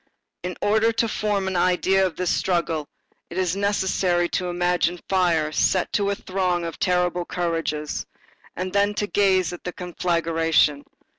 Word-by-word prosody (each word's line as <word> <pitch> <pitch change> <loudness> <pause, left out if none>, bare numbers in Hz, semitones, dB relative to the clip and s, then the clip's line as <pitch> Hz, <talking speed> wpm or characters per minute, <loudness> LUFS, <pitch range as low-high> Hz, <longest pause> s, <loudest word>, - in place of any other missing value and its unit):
In 180 -1 -5
order 220 +2 +3
to 230 - +1
form 205 -3 -1
an 190 - -2
idea 185 +2 +3
of 185 -3 -1
this 180 -1 -1
struggle, 165 -4 0 0.4
it 170 - -7
is 185 -1 +1
necessary 190 -3 +1
to 180 - -1
imagine 175 0 0
fire 170 -5 +2
set 185 +3 +1
to 200 -1 +1
a 200 - 0
throng 185 -3 -1
of 165 - -6
terrible 180 -1 +1
courages, 165 -4 -2 0.5
and 185 +1 -4
then 205 +1 +2
to 205 - 0
gaze 190 -3 +2
at 175 - -9
the 180 - -4
conflagration. 165 -4 +1
180 Hz, 155 wpm, -23 LUFS, 170-190 Hz, 0.5 s, order